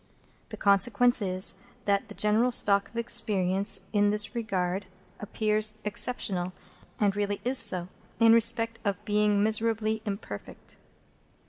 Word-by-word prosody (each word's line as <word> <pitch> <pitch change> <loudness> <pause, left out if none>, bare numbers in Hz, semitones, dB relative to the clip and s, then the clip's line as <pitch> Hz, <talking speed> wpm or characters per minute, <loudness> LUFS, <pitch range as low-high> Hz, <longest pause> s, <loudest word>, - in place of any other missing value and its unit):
The - - -8
consequence 220 +4 +2
is, 185 -1 0 0.3
that 200 +1 0
the 210 - -12
general 220 +4 +1
stock 200 -3 +3
of 230 - -12
experience 195 -4 0
in 205 -1 +2
this 210 +2 +3
regard 190 -5 -3 0.3
appears 215 +1 0
exceptional, 195 -4 -1 0.5
and 200 -2 +1
really 205 0 -2
is 255 +2 +4
so, 185 -5 +3 0.3
in 225 -1 +6
respect 230 0 +1
of 200 -3 -3
being 210 -1 +1
miserably 220 0 -1
imperfect. 195 - -8
210 Hz, 125 wpm, -27 LUFS, 200-225 Hz, 0.5 s, in